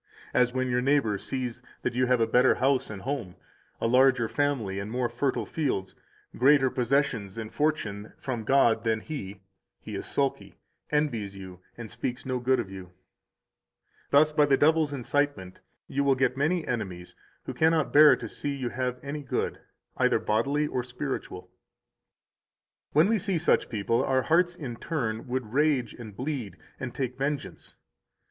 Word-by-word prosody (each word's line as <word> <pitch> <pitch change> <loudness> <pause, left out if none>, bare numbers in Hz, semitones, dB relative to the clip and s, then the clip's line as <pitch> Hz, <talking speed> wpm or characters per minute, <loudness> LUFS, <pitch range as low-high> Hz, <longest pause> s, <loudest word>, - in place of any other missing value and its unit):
184 - - +3
As 125 0 +3
when 130 0 0
your 125 0 +2
neighbor 135 -5 +2
sees 125 -1 -4 0.2
that - - -1
you 125 +1 +1
have 125 -1 +3
a 115 - +4
better 125 +3 +4
house 135 +1 +1
and 100 -3 -7
home 125 -10 -4 0.4
[a - - -2
larger 125 0 +4
family 120 -9 -1
and 100 +1 -5
more 125 +1 0
fertile 125 +3 -1
fields], 130 -12 -2 0.4
greater 135 0 +4
possessions 120 -6 0
and 110 -1 -6
fortune 110 -9 -1
from 120 -4 -4
God 115 -2 +3
than 110 -1 0
he, 100 -11 -7 0.4
he - - -9
is - - -4
sulky, 140 -1 -1 0.3
envies 120 -10 -1
you, 95 -2 -10 0.2
and 115 -3 -8
speaks 125 0 -4
no 130 -1 -1
good 130 +1 +2
of 100 -5 -4
you. 95 -2 -10 1.2
Thus 155 +2 +5
by 150 -1 +3
the 135 -1 +4
devil's 155 0 +3
incitement 140 -7 -2 0.3
you 140 - -1
will 140 -1 +3
get 130 -1 +1
many 155 +4 0
enemies 95 -7 -4 0.3
who - - -4
cannot 160 -2 +2
bear 150 +1 +8
to - - -7
see 145 -1 -4
you 130 -3 -3
have 125 0 -3
any 145 +1 -4
good, 135 - -2 0.4
either - - +3
bodily 140 +8 0
or 130 -4 -2
spiritual. 125 +3 -6 1.4
When 155 +5 +5
we 220 0 +2
see 190 -1 -1
such 165 - +2
people, 115 +3 0
our 130 -1 +1
hearts, 175 +2 +2
in 130 -9 -6
turn, 115 -9 -3
would 125 -3 -3
rage 140 -5 +2
and 110 -4 -10
bleed 130 -6 -4 0.2
and 130 - -4
take 125 0 -4
vengeance. 140 +1 -4
130 Hz, 165 wpm, -27 LUFS, 115-145 Hz, 1.4 s, bear